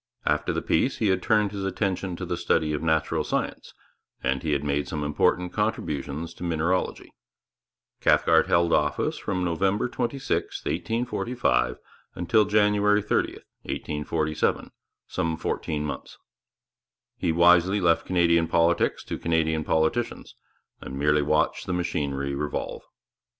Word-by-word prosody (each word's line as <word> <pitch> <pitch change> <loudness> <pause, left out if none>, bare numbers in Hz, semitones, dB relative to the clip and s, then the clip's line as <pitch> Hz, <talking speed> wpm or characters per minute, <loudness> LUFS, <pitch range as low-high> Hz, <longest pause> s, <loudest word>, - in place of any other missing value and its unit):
After - - +1
the - - -2
peace 125 +11 +1
he 110 - +1
had 95 -1 +1
turned 105 -1 +2
his 100 -2 -5
attention 95 -2 -2
to - - -5
the - - -2
study 75 -1 +1
of 75 - -2
natural 80 -1 +1
science, - - -3 0.5
and 65 +1 0
he 75 -2 -1
had 70 0 0
made 75 0 -1
some 75 -2 -3
important 85 +4 +1
contributions 80 -6 -2
to - - -10
mineralogy. 85 +2 -1 0.9
Cathcart - - +4
held 85 -2 +3
office 75 0 +1
from 90 -1 -2
November 95 +6 +1
26, 130 +2 -2
1845, 115 - 0 0.4
until 105 +5 +3
January 105 0 +3
30, 105 - 0 0.3
1847, 75 +1 -2 0.3
some 80 -1 -2
fourteen 75 -2 -2
months. 75 - -6 1.0
He - - +1
wisely 90 +4 +5
left 85 -3 +2
Canadian 85 -2 +3
politics 85 +1 +2
to - - -5
Canadian 80 -1 +1
politicians, 80 +11 -1 0.5
and 65 - -7
merely 75 +1 +3
watched 75 +2 0
the 90 - -1
machinery 70 -5 -2
revolve. 75 +1 -3
85 Hz, 130 wpm, -26 LUFS, 75-95 Hz, 1.0 s, wisely